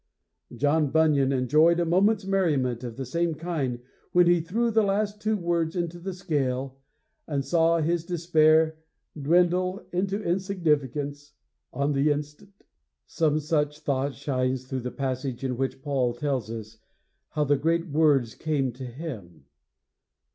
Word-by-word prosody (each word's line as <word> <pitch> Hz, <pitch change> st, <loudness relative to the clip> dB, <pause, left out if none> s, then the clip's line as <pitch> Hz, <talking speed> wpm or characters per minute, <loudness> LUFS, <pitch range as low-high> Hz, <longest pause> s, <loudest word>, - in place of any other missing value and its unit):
"' -, -, -55 dB
John 145 Hz, +3 st, +2 dB
Bunyan 145 Hz, -3 st, +3 dB
enjoyed 150 Hz, +6 st, +3 dB
a 175 Hz, -, +1 dB
moment's 195 Hz, +4 st, +2 dB
merriment 145 Hz, -11 st, 0 dB
of 120 Hz, -1 st, -6 dB
the 135 Hz, -, -4 dB
same 170 Hz, +5 st, -1 dB
kind 150 Hz, -7 st, -2 dB, 0.4 s
when 180 Hz, 0 st, +6 dB
he 175 Hz, -1 st, +4 dB
threw 225 Hz, +8 st, 0 dB
the 220 Hz, 0 st, +4 dB
last 205 Hz, +1 st, -1 dB
two 215 Hz, 0 st, +1 dB
words 170 Hz, -2 st, -1 dB
into 175 Hz, -1 st, -3 dB
the 185 Hz, +1 st, -5 dB
scale 135 Hz, -6 st, -2 dB, 0.5 s
and 140 Hz, -3 st, -2 dB
saw 165 Hz, +3 st, +3 dB
his 165 Hz, +1 st, 0 dB
despair 160 Hz, -2 st, +3 dB, 0.4 s
dwindle 180 Hz, +5 st, +1 dB
into 195 Hz, +3 st, -1 dB
insignificance 150 Hz, -, -1 dB, 0.4 s
on 140 Hz, +1 st, 0 dB
the 140 Hz, +2 st, +2 dB
instant. 150 Hz, +5 st, -4 dB
III -, -, -30 dB, 0.4 s
Some 155 Hz, -2 st, +1 dB
such 150 Hz, -1 st, -1 dB
thought 140 Hz, -1 st, -1 dB
shines 130 Hz, -2 st, -1 dB
through 130 Hz, 0 st, -4 dB
the 125 Hz, -, -4 dB
passage 130 Hz, -1 st, -4 dB
in 130 Hz, -2 st, -1 dB
which 130 Hz, +1 st, -3 dB
Paul 130 Hz, -5 st, 0 dB
tells 130 Hz, -4 st, -2 dB
us 110 Hz, -1 st, -8 dB, 0.5 s
how 150 Hz, -, 0 dB
the 145 Hz, 0 st, +3 dB
great 165 Hz, +4 st, 0 dB
words 145 Hz, -6 st, +2 dB
came 145 Hz, -5 st, -1 dB
to 130 Hz, +2 st, -8 dB
him. 120 Hz, -, -8 dB
150 Hz, 150 wpm, -26 LUFS, 135-170 Hz, 0.5 s, when